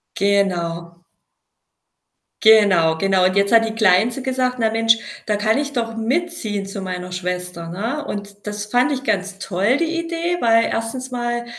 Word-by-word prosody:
Genau. 170 -4 -1 1.4
Genau, 200 -7 +5
genau, 190 0 +2
und 185 +1 +1
jetzt 200 +1 +2
hat 225 -1 +5
die 220 - -5
Kleinste 220 +5 +3
gesagt: 255 -1 -1
„Na 225 -1 +2
Mensch, 225 0 +3 0.3
da 210 - 0
kann 215 +4 +1
ich 285 0 -3
doch 230 -2 -3
mitziehen 230 - -2
zu 195 +1 -7
meiner 180 -1 -5
Schwester“, 180 -1 -4
ne? 230 - -4
Und 205 0 -7
das 210 0 -5
fand 250 +6 +2
ich 265 0 -4
ganz 195 -3 -2
toll 200 +6 0
die 335 +1 -1
Idee, 335 +1 -2
weil 230 0 +4
1. 255 +3 -4
mal, 240 -1 -2
220 Hz, 160 wpm, -20 LUFS, 190-245 Hz, 1.4 s, Genau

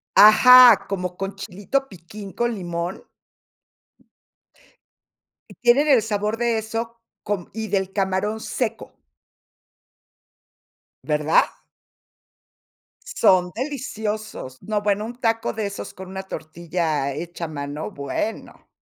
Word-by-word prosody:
Ajá, 245 +1 +8
como 180 -2 -3
con 195 +1 -5
chilito 205 +8 -3
piquín 195 +1 -11
con 240 0 0
limón. 175 -2 -4 2.5
Y - - -14
tienen 255 +5 +3
el 265 -6 +5
sabor 210 0 -2
de 235 -1 +1
eso 225 +2 -4 0.3
con 200 -4 -3
y 220 0 -4
del 195 -2 -1
camarón 195 +2 -1
seco. 225 0 -4 2.1
¿Verdad? 150 0 +3 1.6
Son 185 - +3
deliciosos. 220 - -5
No, 215 -1 -2
bueno, 205 0 0
un 240 +2 -7
taco 225 -1 0
de 220 -2 -3
esos 200 0 -6
con 185 0 -10
una 190 0 -6
tortilla 160 -4 -3
hecha 170 +3 -6
a - - -5
mano, 145 +1 -5
bueno. 145 +8 -5
205 Hz, 110 wpm, -22 LUFS, 180-225 Hz, 2.5 s, Ajá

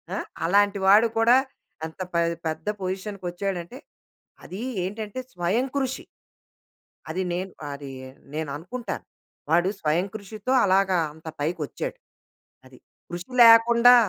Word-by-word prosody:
ఆహ్, - - -3 0.2
అలాంటి 200 +2 +3
వాడు 215 +4 +7
కూడా 235 +3 +6 0.5
ఎంత 160 - -16
పె 170 - +3 0.3
పెద్ద 160 +3 -4
పొజిషన్కొచ్చాడంటే 190 +1 -4 0.7
అది 190 +4 -7 0.2
ఏంటంటే 210 +4 -5
స్వయం 180 +8 +1
కృషి. 265 -1 -2 1.0
అది 185 +4 -2
నేను, 185 +2 -3 0.2
అది 140 -1 -8 0.4
నేననుకుంటాను. 160 - -5 0.5
వాడు 175 +3 +4
స్వయం 160 +4 +1
కృషితో 215 +3 -5
అలాగా 190 -1 +3 0.2
అంత 160 +1 -15
పైకొచ్చాడు. 165 - -3 0.7
అది. - - -16 0.3
కృషి 175 +4 -6
లేకుండా 235 +1 +8
190 Hz, 105 wpm, -25 LUFS, 175-220 Hz, 1.0 s, లేకుండా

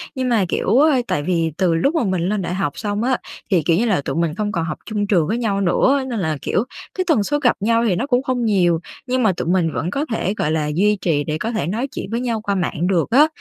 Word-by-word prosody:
Nhưng 255 -1 -1
mà, 215 -6 +2
kiểu, 230 +7 +2 0.3
tại 145 - -1
vì 165 -2 0
từ 180 -3 +2
lúc 275 - +1
mà 315 - +2
mình 185 -4 0
lên 210 -1 0
đại 180 0 -3
học 185 -7 -2
xong 210 0 -2
á, 255 0 +1 0.3
thì, 180 - +4
kiểu 165 -1 +3
như 235 - +2
là, 195 -10 +1
tụi 135 - -4
mình 165 -1 0
không 205 0 -2
còn 165 -3 -1
học 155 - -4
chung 205 -2 -2
trường 175 -7 +2
với 225 +4 0
nhau 205 -4 0
nữa, 265 +9 +2
nên 230 - -2
là, 160 -5 -1
kiểu, 205 - 0 0.3
cái 370 - -1
tần 235 -11 +3
suất 290 +6 -1
gặp 245 -4 +3
nhau 230 +3 +2
thì 185 - +2
nó 270 +9 -2
cũng 250 -1 +2
không 250 -3 -1
nhiều, 175 -6 +2 0.3
nhưng 255 -1 +1
mà 205 - +4
tụi - - -3
mình 175 -2 +1
vẫn 165 - -2
có 280 +6 -1
thể, 205 -3 -1
gọi 150 - 0
là, 155 -2 0
duy 210 +4 +3
trì 150 -4 +1
để 155 +1 -2
có 225 +8 -3
thể 215 -9 -2
nói 230 +9 -2
chuyện - - -5
với 230 - -1
nhau 235 -3 -2
qua 200 -2 -1
mạng 175 -2 -1
được 180 -1 +1
á. 285 +6 +6
200 Hz, 280 wpm, -20 LUFS, 170-235 Hz, 0.3 s, á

